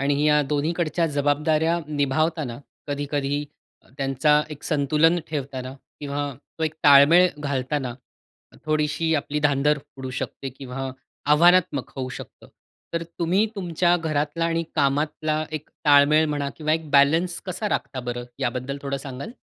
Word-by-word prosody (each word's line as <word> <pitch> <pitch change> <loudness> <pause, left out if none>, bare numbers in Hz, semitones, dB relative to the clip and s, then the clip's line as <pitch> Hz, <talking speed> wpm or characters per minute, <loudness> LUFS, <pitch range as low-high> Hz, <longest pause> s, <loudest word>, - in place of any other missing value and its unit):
आणि 140 +1 +1
या 150 0 +5
दोन्हीकडच्या 155 +4 0
जबाबदाऱ्या 150 +3 +1
निभावताना 150 -2 -1 0.3
कधी-कधी 145 0 -2 0.5
त्यांचा 140 +2 +3
एक 150 -1 -9
संतुलन 155 +3 +2
ठेवताना 130 -3 -4 0.3
किंवा 145 0 -3 0.3
तो - - -3
एक 155 0 -2
ताळमेळ 145 +6 +8
घालताना, 135 -2 -2 0.7
थोडीशी 155 +1 0
आपली 150 0 -1
धांदर 145 0 +2 0.2
उडू 130 -1 -6
शकते 135 - -5
किंवा 135 0 -6 0.4
आव्हानात्मक 170 -3 +4
होऊ 130 -1 -3
शकतं. - - -10 0.5
तर 170 - 0 0.2
तुम्ही 180 +6 +2
तुमच्या 175 -2 +1
घरातला 155 0 -1
आणि 165 0 0
कामातला 155 +2 0
एक 150 - -26 0.2
ताळमेळ 145 +1 +6
म्हणा 145 -1 -2
किंवा 155 -1 -1
एक 160 -1 -1
बॅलन्स 160 +5 +3
कसा 185 +3 -3
राखता 130 -9 -2
बरं 120 0 -3 0.2
याबद्दल 130 +3 -2
थोडं 140 -1 -2
सांगाल? 135 - -7
150 Hz, 130 wpm, -24 LUFS, 140-160 Hz, 0.7 s, ताळमेळ